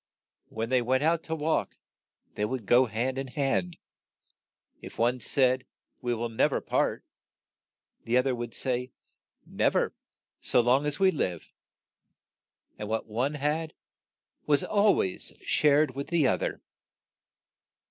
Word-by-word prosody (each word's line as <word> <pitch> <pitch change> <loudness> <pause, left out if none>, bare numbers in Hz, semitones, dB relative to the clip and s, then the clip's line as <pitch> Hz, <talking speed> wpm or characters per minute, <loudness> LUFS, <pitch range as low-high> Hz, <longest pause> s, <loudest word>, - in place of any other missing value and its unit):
When 115 +1 -4
they 130 -1 +3
went 130 +3 +1
out 165 +1 +2
to 160 - -2
walk 160 +1 -1 0.6
they 105 - -3
would 115 +1 -2
go 125 +4 +5
hand 125 +4 -2
in 135 - -4
hand; 140 +6 -1 1.0
if - - -10
one 120 +2 +1
said, 130 +1 +1 0.3
"We 120 -1 -1
will 120 +1 -2
nev 115 -1 +1
er - - +1
part," - - -1 1.0
the 120 +2 +2
oth 125 - +3
er 135 - +1
would 120 -1 -5
say, 125 -1 -2 0.5
"Nev - - 0
er, - - +1 0.5
so - - +3
long 130 +5 +3
as 150 - -1
we 190 -1 +5
live," 90 - -3 1.3
and 105 - -5
what 110 0 -1
one 125 +7 -1
had 150 +3 -2 0.7
was 145 -2 +3
al 205 0 +3
ways 95 - -2
shared 150 -1 +3
with 140 +2 -5
the 165 -5 +2
oth - - +1
er. - - -3
130 Hz, 145 wpm, -28 LUFS, 120-150 Hz, 1.3 s, go